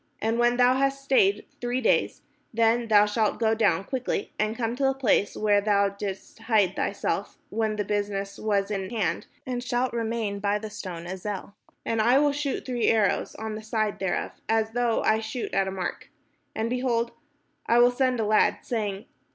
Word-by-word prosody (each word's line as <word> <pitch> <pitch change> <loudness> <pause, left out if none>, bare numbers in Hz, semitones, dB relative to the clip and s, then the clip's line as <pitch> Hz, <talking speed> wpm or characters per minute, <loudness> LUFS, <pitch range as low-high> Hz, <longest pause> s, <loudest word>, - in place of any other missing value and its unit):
And 225 +2 0
when 240 0 +3
thou 250 +1 +4
hast 275 0 0
stayed 215 -7 +3 0.2
three 245 +1 -1
days, 250 - +1 0.3
then 230 +1 +2
thou 210 -1 +6
shalt 210 0 0
go 220 -1 +3
down 200 -5 +2
quickly, 255 -2 -3
and 215 +1 0
come 230 -1 -1
to 275 - -2
the 270 0 +3
place 225 -6 +1
where 205 -1 +3
thou 200 -1 +3
didst 200 +1 -7
hide 215 -5 +2
thyself - - -2
when 220 -1 0
the 210 - -1
business 200 -1 -2
was 205 -1 0
in 195 -2 -3
hand, 215 -6 -2 0.2
and 245 -1 -3
shalt 245 0 -1
remain 225 -3 -2
by 205 0 +1
the 215 0 -7
stone 180 -5 -7
Ezel. 190 +2 -5 0.3
And 225 -1 +1
I 240 +4 +5
will 290 0 +4
shoot 285 -1 -3
three 245 -2 0
arrows 215 -3 +2
on 220 0 -5
the 215 - -6
side 215 -1 -1
thereof, 190 -1 -1 0.2
as 225 0 +1
though 240 -1 +1
I 220 0 +3
shot 225 +2 -5
at 195 0 +2
a - - -2
mark. 185 -2 -5 0.5
And, 220 - -1
behold, 240 -1 0 0.6
I 235 - +4
will 245 +1 +6
send 255 -1 +1
a 220 - +1
lad, 215 +1 +3
saying. 210 -4 -3
220 Hz, 190 wpm, -26 LUFS, 205-240 Hz, 0.6 s, thou